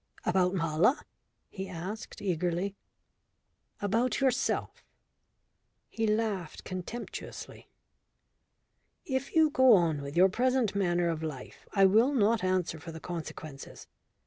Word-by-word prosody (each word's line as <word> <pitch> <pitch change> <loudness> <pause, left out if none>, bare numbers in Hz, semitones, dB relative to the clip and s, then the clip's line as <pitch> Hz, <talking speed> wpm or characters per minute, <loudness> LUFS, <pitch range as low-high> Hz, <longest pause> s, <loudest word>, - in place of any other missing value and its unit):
"About 180 +1 +2
Mala?" 165 - +2 0.5
he 190 -1 -6
asked 190 +4 -7
eagerly. 180 +1 -1 1.0
"About 230 +5 0
yourself." 265 -2 0 1.1
He 225 -1 -1
laughed 210 -6 -1
contemptuously. 185 +6 -7 1.4
"If 265 0 -3
you 315 -2 +5
go 260 -3 +6
on 165 -5 +1
with 140 +3 -6
your 185 +2 +7
present 250 +1 +1
manner 175 -3 +1
of 160 -1 -2
life 150 -5 -7
I 195 -2 +5
will 225 +8 +4
not 225 -2 +3
answer 185 -3 0
for 165 +2 -8
the 160 - -8
consequences. 155 -4 -8
190 Hz, 115 wpm, -30 LUFS, 170-225 Hz, 1.4 s, your